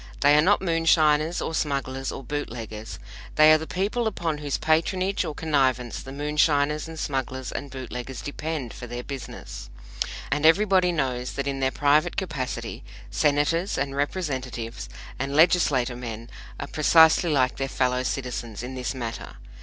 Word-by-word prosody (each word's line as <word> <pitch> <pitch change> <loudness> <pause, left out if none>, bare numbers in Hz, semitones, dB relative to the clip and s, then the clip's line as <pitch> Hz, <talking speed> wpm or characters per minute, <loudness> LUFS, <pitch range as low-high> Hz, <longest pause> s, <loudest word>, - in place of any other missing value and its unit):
They 145 +1 +6
are 150 - +6
not 195 +5 +3
moonshiners 165 -2 +3
or - - -3
smugglers 135 -3 -2
or 135 - -7
bootleggers; 115 -6 -5 0.4
they 155 0 +8
are 155 - +4
the 160 - -6
people 210 +5 -1
upon 165 -7 -2
whose 145 -3 -2
patronage 185 +5 +1
or 155 -4 -5
connivance 130 -6 0
the 135 - -9
moonshiners 150 +1 +1
and 165 0 -9
smugglers 130 -3 -3
and 140 - -5
bootleggers 130 -1 -6
depend 145 -4 -4
for 120 - -8
their 120 +1 -5
business. 135 - -8 0.6
And 145 +1 0
everybody 185 +2 +5
knows 130 -6 -2
that, 140 - -3
in 140 -1 -2
their 130 0 +2
private 150 +5 +2
capacity, 150 -10 -4 0.3
Senators 150 +5 +1
and 135 0 -2
Representatives 130 - -3 0.3
and 140 +2 -2
Legislaturemen 125 -8 +2 0.3
are - - -3
precisely 160 +2 +5
like 130 -3 +2
their 135 0 -2
fellow 125 0 +1
citizens 125 -4 -4
in 125 +1 -6
this 130 +1 -3
matter. 115 -3 -6
145 Hz, 150 wpm, -25 LUFS, 130-160 Hz, 0.6 s, they